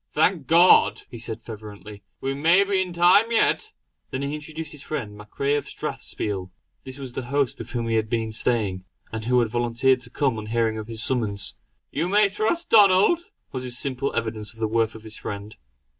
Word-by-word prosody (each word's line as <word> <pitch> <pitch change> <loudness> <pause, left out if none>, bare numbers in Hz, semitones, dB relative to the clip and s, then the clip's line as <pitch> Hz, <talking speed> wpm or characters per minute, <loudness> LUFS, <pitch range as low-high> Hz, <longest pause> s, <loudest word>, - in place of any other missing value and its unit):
"Thank 155 -2 +1
God!" 170 +4 +6
he 120 - -8
said 115 0 -5
fervently 105 -2 -10 0.2
"we 135 0 -1
may 165 +7 +4
be 195 -1 +1
in 185 -1 -3
time 180 +6 +5
yet." 430 - +2 0.4
Then 130 +1 -3
he 140 +1 -2
introduced 155 +1 -6
his 150 - -8
friend 105 -10 -5
MacRae 105 +7 -2
of 145 - -1
Strathspiel. 95 -3 -4 0.3
This 130 0 -8
was 135 -3 -7
the 130 - -4
host 140 -2 0
with 115 +1 -7
whom 120 -2 -3
he 115 -1 +1
had 110 0 -1
been 115 -1 -1
staying; 110 -4 0 0.3
and 110 0 -5
who 125 +1 +2
had 115 - 0
volunteered 120 +3 +2
to - - -11
come, 130 -7 0
on 105 - -7
hearing 110 -1 0
of 110 - -7
his 115 -1 -1
summons: 105 -7 -1 0.4
"You 165 +5 -1
may 205 +1 +4
trust 220 - -1
Donald!" 210 - +5 0.2
was 130 - -4
his 125 -1 -3
simple 135 +1 -2
evidence 110 -1 -3
of - - -16
the 110 - +1
worth 115 0 0
of 110 - -11
his 110 0 -6
friend. 105 +1 -6
125 Hz, 205 wpm, -24 LUFS, 110-155 Hz, 0.4 s, God